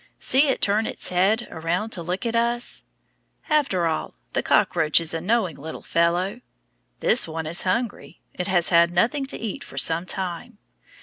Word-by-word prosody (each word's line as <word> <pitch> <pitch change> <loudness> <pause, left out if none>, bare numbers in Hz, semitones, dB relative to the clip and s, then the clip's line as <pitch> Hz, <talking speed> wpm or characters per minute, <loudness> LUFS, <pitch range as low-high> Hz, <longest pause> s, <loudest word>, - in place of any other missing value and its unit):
See 275 +3 +3
it 270 - 0
turn 210 +2 +2
its - - 0
head 195 +6 +1
around 175 +7 -2
to 175 - -1
look 180 +6 -4
at 230 0 -1
us. 235 +1 +1 0.7
After 275 - +2
all, 160 -1 -2 0.2
the - - +1
cockroach 160 -2 +3
is 165 -1 -2
a 165 - -3
knowing 190 -4 0
little 160 +3 -8
fellow. 175 +7 0 0.6
This 245 - +4
one 160 0 -5
is 165 +4 +1
hungry; 230 +4 -3
it 180 - -3
has 175 -3 +2
had 170 -1 +5
nothing 245 +11 0
to - - -4
eat 225 -3 -5
for - - -13
some 165 +2 +2
time. 180 -3 -4
185 Hz, 175 wpm, -23 LUFS, 170-230 Hz, 0.7 s, had